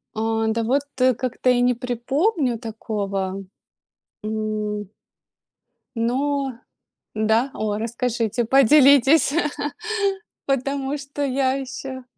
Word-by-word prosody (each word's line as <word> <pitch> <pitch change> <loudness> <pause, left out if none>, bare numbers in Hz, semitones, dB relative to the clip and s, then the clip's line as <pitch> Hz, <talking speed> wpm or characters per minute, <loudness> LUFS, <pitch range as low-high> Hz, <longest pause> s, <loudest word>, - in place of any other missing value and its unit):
А, 225 0 0
да 225 +1 0
вот 260 +5 +2
как-то 255 0 +1
и 245 -1 +4
не 250 0 +3
припомню 255 - 0
такого. 200 -4 -4 0.8
М. 215 -2 -3 1.1
Но 270 +4 0 0.6
Да? 220 +5 +2
О, 210 -1 -2
расскажите, 235 0 -1
поделитесь. 275 +3 +5 1.1
Потому 275 +1 -1
что 280 +1 -5
я 265 -1 +1
ещё 265 -1 -6
245 Hz, 90 wpm, -22 LUFS, 220-270 Hz, 1.1 s, поделитесь